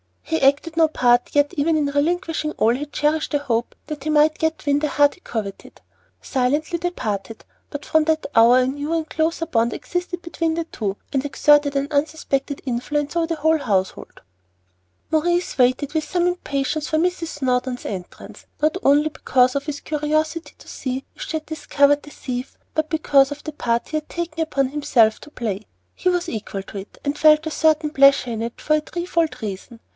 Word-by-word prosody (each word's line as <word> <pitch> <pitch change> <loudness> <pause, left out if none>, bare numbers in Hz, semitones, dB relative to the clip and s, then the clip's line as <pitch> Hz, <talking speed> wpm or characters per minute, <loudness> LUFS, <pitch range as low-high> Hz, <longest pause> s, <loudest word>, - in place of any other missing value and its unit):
He 320 0 -2
acted 285 +4 +2
no 325 -1 +6
part, 245 -5 +2
yet, 290 0 +2
even 315 +3 +2
in 300 -2 +1
relinquishing 310 +2 -1
all, 225 +2 +2
he 275 +4 -3
cherished 300 +2 0
a - - +4
hope 240 -5 -2
that 295 -2 -6
he - - -1
might 305 +1 +3
yet 320 -1 -1
win 285 0 +3
the 305 - 0
heart 290 0 +3
he - - -23
coveted. 215 - -6 0.4
Silently 295 +7 0
they 355 +1 0
parted, 220 - -5 0.3
but 290 0 -7
from 315 -1 +2
that 320 0 +1
hour 235 +3 +6
a 255 - +3
new 290 +4 -3
and 325 -1 -1
closer 325 +1 0
bond 235 -7 +1
existed 355 0 -4
between 335 -1 -2
the 335 - -1
two, 210 -11 -4 0.2
and 270 -1 +1
exerted 290 0 +3
an 275 +1 0
unsuspected 285 -2 -1
influence 285 +5 -2
over 335 -1 +1
the 330 - -1
whole 315 +1 +2
household. 190 -8 -2 0.9
Maurice 345 +3 +1
waited 255 +3 +2
with 315 -1 0
some 350 -1 0
impatience 305 -4 -1
for 315 - 0
Mrs. 345 0 0
Snowdon's 255 -3 -2
entrance, 185 -3 -8
not 310 +4 +2
only 290 +2 +4
because 255 -4 +2
of 280 0 -1
his 295 -2 -5
curiosity 310 +2 -1
to - - -17
see 260 0 -4
if - - -8
she 320 - -2
had 310 - -8
discovered 290 -2 +2
the - - -11
thief, 255 -2 -6 0.2
but 315 0 -1
because 285 -3 +3
of 290 0 -7
the 310 - -5
part 235 -5 -1
he 310 - -1
had 305 - -6
taken 340 -2 -5
upon 275 -4 0
himself 270 -6 +2
to - - -13
play. 215 -7 -4 0.3
He 365 - 0
was 355 -1 0
equal 200 -3 -5
to 200 - -9
it, 195 - -12
and 285 +1 -2
felt 305 0 +6
a 315 - -3
certain 310 -1 +2
pleasure 275 -3 +5
in 225 -1 -3
it 230 +1 -5
for 305 - +2
a - - -2
threefold 335 0 -2
reason. 215 +3 -6
295 Hz, 195 wpm, -22 LUFS, 260-315 Hz, 0.9 s, no